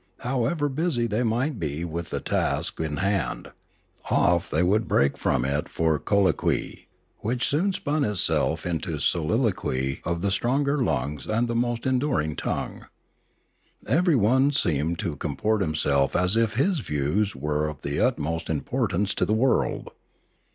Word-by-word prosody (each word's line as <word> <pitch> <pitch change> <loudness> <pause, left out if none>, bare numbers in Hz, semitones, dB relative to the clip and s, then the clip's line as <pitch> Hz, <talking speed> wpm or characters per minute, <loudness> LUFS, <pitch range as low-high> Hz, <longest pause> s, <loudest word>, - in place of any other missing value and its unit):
However 135 +5 0
busy 145 -3 0
they 110 +1 0
might 125 +3 0
be 80 +1 -3
with 85 0 -5
the - - -2
task - - -1
in 80 -2 -2
hand, 95 -1 -1 0.6
off 85 -1 +2
they 80 +4 +1
would 105 +5 +2
break 70 +1 +2
from - - 0
it 70 +2 -1
for 80 -2 +1
colloquy, 100 +4 0 0.3
which 125 +3 -1
soon 175 +8 +1
spun 150 -4 -1
itself 105 -6 0
into 85 -1 -2
the 75 - -3
soliloquy 80 - 0
of 85 -1 -2
the 100 +1 0
stronger 140 +6 +1
lungs 70 - -2
and 115 +3 +1
the 120 - -2
most 120 0 -1
enduring 125 - 0
tongue. - - -4 1.0
Everyone 135 - +3
seemed 85 - 0
to 85 -8 -3
comport 105 +10 -1
himself 75 -5 +1
as 90 +3 +2
if 115 -1 +1
his 160 - +2
views 90 - -1
were 75 +2 -1
of 75 -2 -7
the 70 +1 -2
utmost 80 +3 0
im 80 -3 0
portance 105 -6 -1
to - - -1
the 105 - +2
world. 130 +2 +1
100 Hz, 150 wpm, -25 LUFS, 75-125 Hz, 1.0 s, Everyone